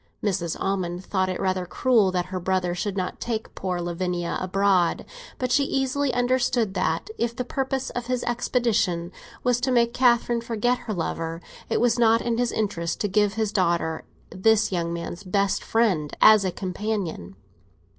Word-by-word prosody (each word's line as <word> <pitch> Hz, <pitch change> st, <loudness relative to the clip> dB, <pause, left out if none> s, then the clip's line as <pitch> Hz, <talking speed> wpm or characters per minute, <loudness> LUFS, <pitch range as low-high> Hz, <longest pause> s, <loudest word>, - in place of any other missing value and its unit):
Mrs. 180 Hz, -5 st, -1 dB
Almond 185 Hz, -2 st, -2 dB
thought 185 Hz, -1 st, 0 dB
it 185 Hz, -, -3 dB
rather 185 Hz, -2 st, -1 dB
cruel 220 Hz, -1 st, +3 dB
that 180 Hz, -1 st, -1 dB
her 185 Hz, -, -1 dB
brother 185 Hz, -1 st, 0 dB
should 195 Hz, +3 st, -3 dB
not 185 Hz, -1 st, -3 dB
take 225 Hz, -2 st, -4 dB
poor 180 Hz, -2 st, -3 dB
Lavinia 175 Hz, 0 st, -2 dB
abroad; 185 Hz, -2 st, +2 dB, 0.3 s
but 255 Hz, -1 st, -2 dB
she 280 Hz, -, +4 dB
easily 270 Hz, 0 st, 0 dB
understood 245 Hz, -3 st, +1 dB
that, 190 Hz, -, -1 dB
if 235 Hz, 0 st, -1 dB
the 250 Hz, -, -3 dB
purpose 265 Hz, 0 st, -2 dB
of 245 Hz, -1 st, -5 dB
his 250 Hz, -1 st, -1 dB
expedition 230 Hz, -8 st, 0 dB, 0.3 s
was 245 Hz, -1 st, +2 dB
to 260 Hz, -, 0 dB
make 235 Hz, -2 st, +3 dB
Catherine 240 Hz, -2 st, +3 dB
forget 235 Hz, +2 st, 0 dB
her 240 Hz, -3 st, -5 dB
lover, 165 Hz, -1 st, -3 dB, 0.3 s
it -, -, +1 dB
was 240 Hz, 0 st, +2 dB
not 230 Hz, -1 st, +5 dB
in 235 Hz, 0 st, -1 dB
his 245 Hz, -1 st, +1 dB
interest 175 Hz, -6 st, -2 dB
to 205 Hz, -, +1 dB
give 205 Hz, 0 st, +2 dB
his 220 Hz, -2 st, -1 dB
daughter 170 Hz, -4 st, 0 dB, 0.3 s
this 220 Hz, +2 st, +3 dB
young 170 Hz, -2 st, -1 dB
man's 170 Hz, +2 st, -5 dB
best 195 Hz, +1 st, 0 dB
friend 190 Hz, -10 st, +1 dB
as 215 Hz, -2 st, +7 dB
a 185 Hz, -, 0 dB
companion. 185 Hz, -, -4 dB
205 Hz, 170 wpm, -25 LUFS, 180-240 Hz, 0.3 s, as